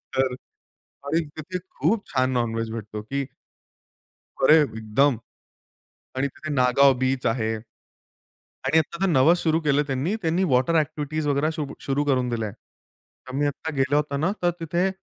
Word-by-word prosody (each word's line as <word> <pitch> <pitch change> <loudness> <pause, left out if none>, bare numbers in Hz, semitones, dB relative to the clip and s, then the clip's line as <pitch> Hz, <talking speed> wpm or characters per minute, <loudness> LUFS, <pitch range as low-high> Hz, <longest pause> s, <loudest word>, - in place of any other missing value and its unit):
तर 130 -1 +2 0.7
आणि 155 +4 +1 0.2
तिथे 180 +4 -5 0.2
खूप 200 - +1
छान 130 -1 +1
नॉन-व्हेज 115 -2 -1
भेटतो 110 -1 -6
की 135 +6 -3 1.2
अरे! 155 +4 +8
एकदम 115 +1 +1 1.0
आणि 135 +2 +1
तिथे 155 +3 -8
नागाव 135 +1 +5
बीच 130 0 0
आहे. 110 -1 0 1.1
आणि 150 +5 +4
आता 165 +1 -1
तर - - +4
नवं 155 +2 +5
सुरु 165 -2 +1
केलं 145 -2 +2
त्यांनी 140 +8 -1
त्यांनी 170 +2 +1
वॉटर 130 0 +2
अ‍ॅक्टिव्हिटीज 155 0 -1
वगैरे 145 +2 +1
सुरू 150 -3 -5
शुरू 140 +1 -1
करून 130 -3 +1
दिल्या. 115 -3 -2
तर 130 - -19
मी 145 +2 +1
आता 145 +3 -3
गेलो 135 +2 +2
होतो 150 -1 0
ना 160 +6 +1
तर 175 - +4
तिथे 170 +3 0
140 Hz, 150 wpm, -24 LUFS, 130-155 Hz, 1.2 s, अरे